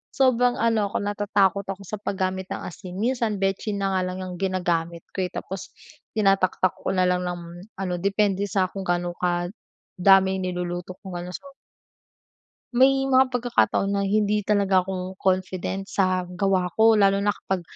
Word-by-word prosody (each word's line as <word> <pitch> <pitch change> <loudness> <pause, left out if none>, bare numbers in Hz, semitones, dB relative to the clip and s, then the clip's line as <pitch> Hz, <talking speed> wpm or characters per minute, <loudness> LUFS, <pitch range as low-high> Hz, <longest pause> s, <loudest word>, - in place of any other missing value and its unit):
sobrang 250 -2 +3
ano 225 -3 +2
ako, - - -1
natatakot 200 -1 +1
ako 195 0 -5
sa 215 - -4
paggamit 190 -1 -2
ng - - -4
asin, 180 +1 -8
minsan 230 -2 0
betsin 195 +1 -1
na 195 - +1
nga 185 - +2
lang 185 0 -4
yang 185 - -6
ginagamit 175 -3 -1
ko 190 - -1
eh. 180 - -6
Tapos 190 0 -6 0.4
tinataktak 195 -3 +2
ko - - -1
na 185 - +3
lang 180 0 +1
ng 175 0 -3 0.4
ano 185 -2 -2
depende 200 0 +1
sa 190 -1 +2
kung 195 - -5
gaano 175 0 0
kadami 190 +1 +1
yung 185 - -3
niluluto 180 0 -4
kong 190 -2 -7
ano 180 +1 -7
so - - -9 1.3
May 270 +2 +4
mga 260 -1 +4
pagkakataon 240 -5 +1
na 200 - +1
hindi 210 +1 +1
talaga 200 -2 +3
ako 185 0 -5
confident 190 0 -1
sa 185 -2 0
gawa 180 0 0
ko 220 0 +5
lalo 195 -1 +4
na 205 - +1
kapag 190 -2 -3
195 Hz, 165 wpm, -24 LUFS, 185-205 Hz, 1.3 s, ko